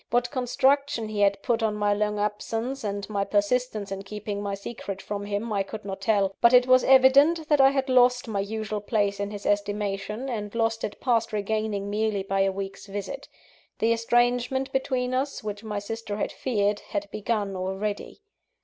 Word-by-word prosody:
What 245 +1 +1
construction 265 -2 +1
he 215 -1 -4
had 200 -1 +2
put 235 -3 +1
on 220 -2 +1
my 205 -1 +2
long 210 0 0
absence 225 +5 -2
and 200 -1 -3
my 200 -2 -1
persistence 205 +1 0
in 195 0 -4
keeping 205 0 -5
my 200 -1 -2
secret 200 -1 -6
from 205 0 -5
him, 205 +2 -2
I 200 - +1
could 210 +1 -7
not 195 -1 -5
tell; 200 -2 +2
but 235 +1 +6
it 250 0 +6
was 255 0 +5
evident 280 +5 +5
that 295 -2 +5
I 270 - +7
had 270 -1 -1
lost 250 -1 +4
my 210 -3 -2
usual 215 +1 -3
place 205 -1 0
in 200 0 -2
his 205 -1 -8
estimation, 205 +3 -1
and 210 -4 -4
lost 225 -1 0
it 205 - -4
past 230 -3 +1
regaining 210 -1 -2
merely 210 -2 0
by 195 0 -1
a 195 0 +3
week's 195 +1 -6
visit. 200 0 -6 0.5
The 230 +1 +3
estrangement 245 +3 +1
between 255 -1 -1
us, 270 0 -2
which 210 0 -5
my 210 -2 -4
sister 205 0 -5
had - - -2
feared, 205 -5 0
had 205 -1 -4
begun 210 -2 -2
already. 195 - -4
215 Hz, 185 wpm, -26 LUFS, 200-245 Hz, 0.5 s, I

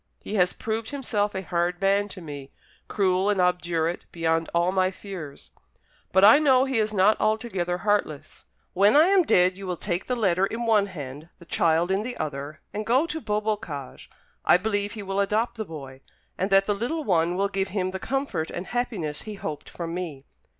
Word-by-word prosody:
He - - -8
has 180 -4 +3
proved 220 0 -4
himself 215 -8 -1
a 190 - -3
hard 175 0 -1
man 200 +1 +2
to 185 - -10
me, 145 -4 -8 0.4
cruel 190 -1 +1
and 205 -2 +1
obdurate 175 -2 0
beyond 165 -1 0
all 170 +2 +2
my 185 -1 +2
fears; 185 -6 -9 0.6
but 190 +1 +4
I 225 +8 +8
know 265 -4 +4
he 265 -4 0
is 215 0 +1
not 210 +1 +3
altogether 215 -5 0
heartless. 175 -7 -2 0.3
When 200 +5 +4
I 315 +5 +6
am 390 -1 +5
dead, 185 - +3
you 195 - -7
will 180 -1 -2
take 175 0 -3
the 250 - 0
letter 195 -4 +2
in 235 +3 -4
one 215 -3 +3
hand, 150 -3 -8
the 170 - -15
child 170 -1 +2
in 195 +1 +1
the 245 +3 -5
other, 145 0 -5
and 210 - -3
go 255 +8 +3
to 320 -1 -4
Beaubocage. 210 - -3 0.3
I - - +6
believe 205 +1 -1
he 215 -3 -6
will 195 0 -2
adopt 215 +4 +1
the 220 -2 -4
boy, 135 -6 -9 0.3
and 190 - -1
that 195 0 +5
the 205 - +1
little 245 +10 -2
one 175 - +1
will 200 +2 +1
give 195 -1 -1
him 185 -1 -2
the 190 - -5
comfort 270 - -2
and 175 - -5
happiness 205 -11 -3
he 215 -1 -7
hoped 150 -6 -6
from 170 -1 -6
me. 160 -6 -5
195 Hz, 200 wpm, -25 LUFS, 170-215 Hz, 0.6 s, I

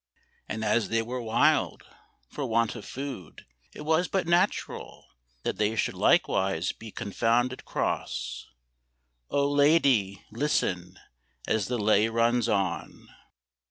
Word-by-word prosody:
And 110 0 -3
as 105 -1 +1
they 115 0 +1
were 125 +2 -4
wild 115 -1 +2 0.4
For 145 - -5
want 115 -1 +1
of 115 - -9
food, 130 - -7 0.3
it - - -10
was 160 +4 +2
but 190 -3 -1
natural 175 +4 0 0.4
That - - -2
they 105 +1 +1
should - - 0
likewise 95 -3 +2
be 110 - -11
confounded 120 +6 0
cross; 60 0 -3 0.8
Oh, 140 0 +2
lady, 140 - +3
listen 105 - -1 0.5
as 110 -3 +1
the 125 - -1
lay 105 0 +3
runs 115 +1 +2
on! 95 -6 -2
115 Hz, 125 wpm, -27 LUFS, 100-135 Hz, 0.8 s, lady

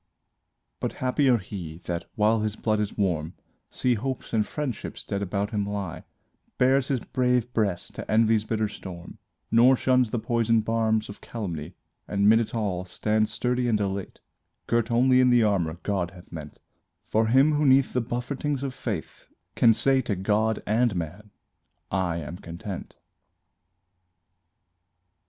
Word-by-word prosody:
But - - -2
happier 130 0 +2
he, 90 -5 -7
that, 85 -1 -3
while 110 +1 +3
his 110 -1 -1
blood 110 -1 0
is 105 -1 -3
warm, 85 -5 -1 0.3
See 125 - +1
hopes 125 +3 -4
and 110 -2 +2
friendships 145 -7 -5
dead 100 - -3
about 100 +1 -2
him 105 -2 0
lie 100 -5 -4 0.5
Bares 130 +1 +3
his 130 -4 0
brave 125 -2 0
breast 100 -6 -1
to - - -6
envy's 110 -1 +4
bitter 110 0 -1
storm, 90 -4 -9 0.3
Nor 120 +3 +6
shuns 130 -2 +2
the 120 - -2
poison 115 0 +2
barbs 110 0 +1
of 100 - -10
calumny; 85 -10 -5 0.3
And 100 0 +1
'mid 110 +1 +7
it 115 0 -3
all, 100 -5 -1
stands 110 +3 0
sturdy 125 +2 0
and 110 -3 +2
elate, 100 -1 -3 0.5
Girt 115 0 +1
only 125 +2 +4
in 125 - +5
the 120 -2 +5
armor 90 -6 +1
God 95 -4 -1
hath 90 -2 -15
meant 75 -3 -8 0.5
For 110 +1 +2
him 135 +6 +5
who 150 +1 +1
'neath 135 -1 +4
the 125 - +1
buffetings 130 +4 -3
of 135 -2 -3
fate 105 -10 -3 0.5
Can 115 - +6
say 135 +4 +3
to 115 -5 -2
God 105 +3 0
and 115 0 +2
man: 90 +5 -5 0.6
"I 90 -3 0
am 85 +2 -6
content." 90 +2 -7
110 Hz, 155 wpm, -26 LUFS, 100-125 Hz, 0.6 s, mid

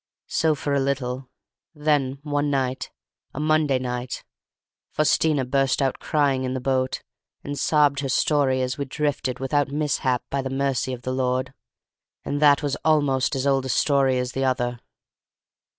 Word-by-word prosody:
So 160 -2 +1
for 145 0 -2
a 140 - +3
little; 135 -1 -2 0.5
then 145 -3 +1
one 145 -1 0
night, 130 -2 -1 0.5
a - - -4
Monday 155 -3 +2
night, 125 0 -4 0.7
Faustina 155 -2 +2
burst 135 0 +1
out 135 -2 0
crying 140 -3 +1
in 130 0 -2
the - - -1
boat; 130 0 -1 0.4
and 145 - -4
sobbed 145 -1 +3
her 135 -1 -2
story 130 -2 +2
as 130 +1 -3
we 140 - -1
drifted 135 -2 -2
without 135 +2 0
mishap 140 -3 0
by 140 - 0
the 135 - -4
mercy 135 -1 -1
of 125 -1 -6
the 130 - -2
Lord. 130 +1 -1 0.7
And 145 +1 -2
that 145 0 +5
was 145 -2 0
almost 145 -4 +2
as 135 0 -1
old 135 -1 +2
a - - -4
story 135 -1 +2
as 125 0 -2
the 135 - -2
other. 125 -2 0
135 Hz, 165 wpm, -24 LUFS, 130-145 Hz, 0.7 s, that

